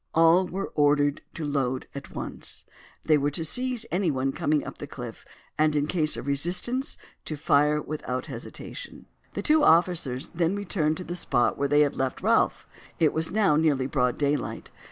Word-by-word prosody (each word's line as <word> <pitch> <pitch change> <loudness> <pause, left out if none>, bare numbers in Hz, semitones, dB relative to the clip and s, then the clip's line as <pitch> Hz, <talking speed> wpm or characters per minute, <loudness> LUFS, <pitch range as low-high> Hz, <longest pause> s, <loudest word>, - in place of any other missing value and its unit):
All 165 +3 +5
were 195 +3 -4
ordered 145 0 +2
to 160 - -4
load 135 -3 -1
at 140 0 -9
once. - - -5 0.4
They 155 -2 +4
were 145 +1 +1
to 160 +3 -2
seize 250 +6 0
anyone 145 -8 0
coming 150 +2 0
up - - -8
the - - -6
cliff, - - -8 0.4
and 155 -1 +3
in 145 0 +2
case 155 -1 +2
of - - -6
resistance 180 - 0 0.3
to 155 - -3
fire 150 +1 +3
without 140 -4 -4
hesitation. - - -8 0.3
The - - -3
two 310 0 +4
officers 160 - +2
then 170 +2 0
returned 170 -6 -1
to 185 - -5
the 175 - -5
spot 120 -8 +1
where 140 - 0
they 145 +1 +4
had 145 -2 +2
left 130 -1 -2
Ralph. - - +2 0.3
It 155 -2 +3
was 160 +1 +1
now 200 -7 +3
nearly 150 -5 +2
broad 125 -2 0
daylight. 145 0 -2
155 Hz, 175 wpm, -26 LUFS, 140-175 Hz, 0.4 s, All